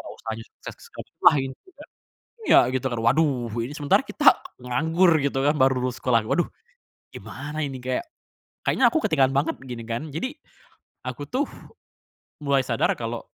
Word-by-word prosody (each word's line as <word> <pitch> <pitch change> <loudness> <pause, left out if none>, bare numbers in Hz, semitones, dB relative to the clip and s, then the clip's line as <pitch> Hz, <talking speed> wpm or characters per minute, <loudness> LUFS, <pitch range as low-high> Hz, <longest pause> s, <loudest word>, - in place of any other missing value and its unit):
oh, - - -9
usahanya 110 0 -6
sukses - - -10
segalanya, - - -11
wah 155 - +8
ini 135 0 -4
juga 335 -6 -14 0.6
iya - - +6 0.2
gitu 130 0 -1
kan, 120 - -2
waduh 125 0 +2 0.2
ini 130 - -6
sementara 145 -2 +3
kita - - -5 0.4
nganggur 160 +9 +2
gitu 135 -1 0
kan, 150 - +3
baru 130 -1 +4
lulus 125 0 -2
sekolah, 120 -3 +3
"Waduh 175 - +2 0.7
gimana 150 +2 -7
ini? 135 -2 -6
Kayak, 130 - -2 0.6
kayaknya - - +4
aku 325 - +1
ketinggalan 135 -4 +3
banget," 140 +2 +1
gini 120 -3 -7
kan. 115 +7 -4
Jadi, 255 - -2 0.7
aku 125 +2 -5
tuh 275 +3 0 1.0
mulai 140 -1 +3
sadar - - +1
kalau - - -5
135 Hz, 160 wpm, -24 LUFS, 125-155 Hz, 1.0 s, wah